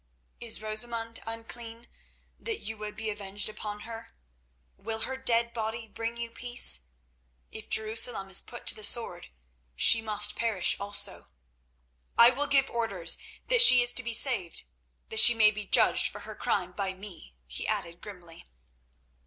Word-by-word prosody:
"Is 225 -2 -3
Rosamund 230 +1 -3
unclean 230 +1 -10 0.5
that 450 -2 -5
you 220 +1 -7
would 210 -1 -9
be 220 -1 -5
avenged 205 0 -3
upon 210 -1 -9
her? 225 0 -12 0.6
Will 220 +1 -7
her 265 - -4
dead 235 -3 -1
body 225 0 -6
bring 230 +2 -7
you 235 -1 -7
peace? 230 - +3 0.7
If 220 - -12
Jerusalem 220 -1 +1
is 190 -1 +3
put 240 - -13
to - - 0
the 215 - -11
sword, 225 - +1 0.5
she 225 - +6
must 210 -2 -1
perish 210 -6 0
also." 205 0 -1 0.9
"I 235 +1 +7
will 285 +3 -3
give 275 -2 +2
orders 200 -8 -2 0.3
that - - +4
she 255 - +8
is 240 - +5
to 255 - +1
be 235 -2 -1
saved—that 170 - -1
she 235 +1 +9
may 215 -1 +4
be 210 -1 -8
judged - - +3
for - - -8
her - - -10
crime - - -3
by 195 -2 -5
me," 185 - -15
he 60 0 -3
added 170 0 -4
grimly. 175 - -14
220 Hz, 155 wpm, -27 LUFS, 200-235 Hz, 0.9 s, she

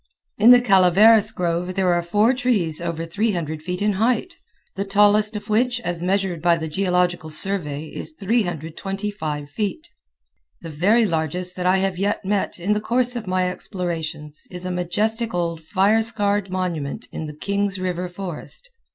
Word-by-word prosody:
In 220 +3 +7
the 245 0 +9
Calaveras 210 +1 +5
grove 180 -2 -2
there 185 -2 +2
are 175 - +1
four 210 +8 +2
trees 215 - 0
over 165 -1 -3
300 170 -5 -2
feet 180 +4 -3
in 210 0 +2
height, 255 +10 +1 0.4
the 195 - -1
tallest 210 +2 +3
of 210 0 -6
which 245 +3 +1
as 175 -5 -4
measured 185 -2 0
by 170 0 +3
the 160 -1 -4
Geological 180 -1 0
Survey 155 -3 -2
is 235 - -7
325 190 -4 -2
feet. 210 - -4 0.7
The 165 - -8
very 205 +10 +3
largest 175 +1 -2
that 180 0 -2
I 185 +1 +4
have 190 -1 -1
yet 200 0 -1
met 200 -1 -1
in 185 +4 -1
the 210 - -1
course 245 +2 +2
of 225 -4 -5
my 185 0 +1
explorations 160 -5 -4
is 180 0 -6
a 185 - -2
majestic 210 +6 -1
old 170 -2 -2
fire 195 +7 +2
scarred 205 -3 0
monument 175 -6 -3
in 155 - -5
the 150 - -8
Kings 200 +2 -1
River 180 -1 -3
forest. 190 - -8
185 Hz, 165 wpm, -22 LUFS, 170-210 Hz, 0.7 s, the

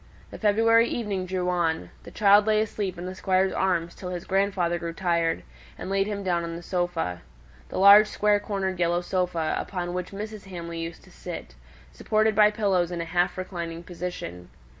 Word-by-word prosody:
The - - -9
February 225 +2 +4
evening 200 -5 -3
drew 180 -1 -2
on; 165 - -1
the - - -11
child 205 0 +5
lay 215 -1 +4
asleep 205 -4 -2
in 175 - -6
the 185 - -5
Squire's 190 0 +1
arms 175 -3 0
till 180 - -7
his 180 -1 -5
grandfather 190 -3 +1
grew 170 0 -4
tired, 170 -2 0 0.3
and 190 - -6
laid 195 0 +1
him 205 -1 -3
down 175 -2 0
on 170 0 -5
the 170 - -8
sofa: 175 - -2 0.5
the - - -5
large 200 +2 +8
square 210 0 +2
cornered 195 -3 -3
yellow 175 0 +2
sofa 175 -3 -1
upon 175 -2 -4
which 180 0 -3
Mrs. 210 +1 -7
Hamley 170 -3 -6
used 165 0 -6
to - - -18
sit, - - -8 0.4
supported 215 0 +1
by 210 0 +6
pillows 195 -5 +1
in 175 -1 -4
a 170 - -2
half 175 +2 0
reclining 170 -2 -5
position. 170 - -6
180 Hz, 185 wpm, -26 LUFS, 170-200 Hz, 0.5 s, large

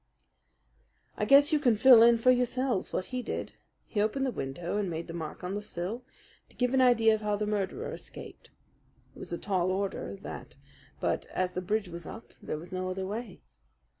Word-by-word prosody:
"I 210 - -1
guess 285 +6 +6
you 305 - +4
can 245 -6 +3
fill 235 +1 +8
in 235 0 +7
for 255 +3 +5
yourselves 250 -2 0
what 185 - -2
he 250 - -1
did. - - -5 0.3
He 205 - -1
opened 245 +6 0
the 260 - 0
window 170 - -4
and 205 -3 -1
made 165 0 -4
the 165 - -8
mark 160 0 -6
on 180 +1 -3
the 205 - -3
sill 210 +4 -5 0.5
to - - -22
give 250 0 0
an 265 - +4
idea 230 -3 +5
of 220 - -1
how 210 -1 0
the 210 +1 -2
murderer 210 - -2
escaped. - - -10 0.7
It - - -13
was - - -8
a 170 - -2
tall 185 -2 0
order, 190 - -2
that; - - -8 0.4
but - - -1
as 185 -1 -2
the 180 - -2
bridge 205 +2 -1
was 170 -1 -8
up 225 - -10
there - - -4
was 170 +4 -10
no 185 0 -3
other 190 +1 -3
way. 210 0 -6
210 Hz, 205 wpm, -29 LUFS, 185-245 Hz, 0.7 s, fill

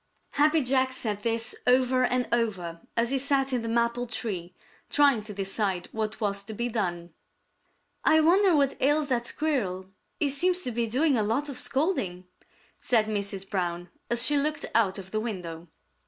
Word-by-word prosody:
Happy 300 +2 +3
Jack 260 0 +2
said 215 -5 -2
this 230 +2 -1
over 255 0 +4
and 250 0 +1
over 190 -8 -1 0.2
as 235 +2 +2
he 270 - +1
sat 270 0 +1
in 245 - +1
the 230 - -5
maple 235 +1 0
tree, 190 -7 -4 0.3
trying 280 -6 +4
to 210 0 -9
decide 195 -2 -2
what 220 -1 -3
was 200 -2 -1
to 210 +2 -8
be 235 +3 -1
done. 175 -7 -3 0.9
"I 315 - +5
wonder 360 +3 +4
what 280 -2 +1
ails 290 +2 +2
that 240 -2 0
Squirrel. 195 -12 -2 0.3
He 295 - +2
seems 360 +6 +1
to 250 - -2
be 235 0 -1
doing 270 +4 +2
a - - +2
lot 240 +8 -1
of 260 -3 -6
scolding," 215 - -1 0.5
said 225 -3 +2
Mrs. 200 -2 -4
Brown, 175 -3 -3 0.2
as 235 +1 +4
she 295 - +3
looked 295 +1 -1
out 210 -4 +2
of 190 -1 -9
the 215 - 0
window. 180 -7 -5
235 Hz, 175 wpm, -27 LUFS, 200-270 Hz, 0.9 s, I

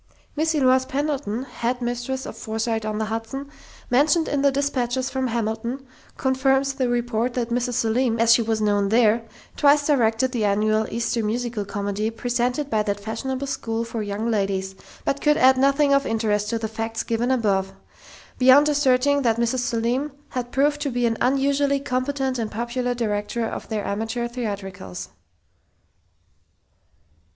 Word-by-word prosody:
Miss 320 +1 +1
Eloise 260 -2 +3
Pendleton, 270 -5 -2
head 245 -1 -3
mistress 245 +2 -3
of - - -7
Forsyte 220 0 -2
on 215 0 -2
the 220 - -1
Hudson, 225 +6 -5 0.4
mentioned 300 +6 +3
in 285 -1 0
the 280 0 +4
dispatches 260 -2 -1
from 260 -1 -1
Hamilton, 235 +3 -3 0.3
confirms 270 +1 +2
the 260 -2 -1
report 240 0 -1
that 240 -2 -2
Mrs. 245 +1 0
Selim, 230 0 +1
as 230 0 +6
she 235 - +4
was 225 -1 0
known 205 -1 +2
there, 225 0 +3 0.3
twice 290 0 +4
directed 250 -3 +2
the 240 -4 -1
annual 215 +2 +2
Easter 230 0 -1
musical 225 -1 -2
comedy 200 +2 -2
presented 245 +4 -1
by 220 -6 +1
that 205 -1 -2
fashionable 255 +6 -4
school 230 -4 -3
for 230 -1 -4
young 210 +3 -2
ladies, 195 -2 -1 0.3
but 280 - -1
could 300 0 +3
add 260 0 +5
nothing 280 +1 +3
of 275 0 +2
interest 210 -2 0
to 230 - 0
the 225 -1 -3
facts 225 +1 -4
given 235 +2 -1
above, 200 -7 +1 0.7
beyond 265 +3 +7
asserting 285 -1 +3
that 230 -3 +2
Mrs. 235 +2 0
Selim 245 +4 -1 0.2
had 245 -1 -4
proved 290 +2 +1
to 290 - 0
be 245 -1 0
an 230 -1 +1
unusually 275 +2 +2
competent 265 -1 -1
and 220 -2 -2
popular 245 +3 -2
director 225 0 -2
of - - -6
their 215 -2 -2
amateur 225 +4 -2
theatricals. 200 - -6
240 Hz, 160 wpm, -23 LUFS, 220-265 Hz, 0.7 s, beyond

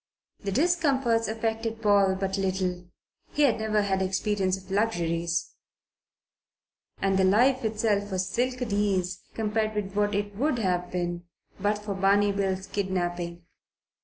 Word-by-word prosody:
The 200 - -4
discomforts 270 - +2
affected 225 0 -2
Paul 200 -3 +4
but 190 0 -2
little, 185 -2 -1 0.5
he 295 - +2
had 240 -5 +3
never 215 -1 +1
had 190 -1 0
experience 190 0 0
of 190 0 -13
luxuries, 170 -5 0 1.5
and 195 0 +1
the - - +4
life 245 +8 +4
itself 210 -2 0
was 185 0 -1
silken 250 +3 -1
ease 190 -3 0
compared 215 0 -1
with 195 -2 -3
what 205 0 +1
it 205 0 -2
would 270 +4 +1
have 180 -5 0
been 175 -1 -3 0.3
but 205 +2 +1
for 210 -1 -4
Barney 200 +1 +3
Bill's 190 -1 -1
kidnapping. 175 -3 -3
200 Hz, 135 wpm, -27 LUFS, 190-220 Hz, 1.5 s, Paul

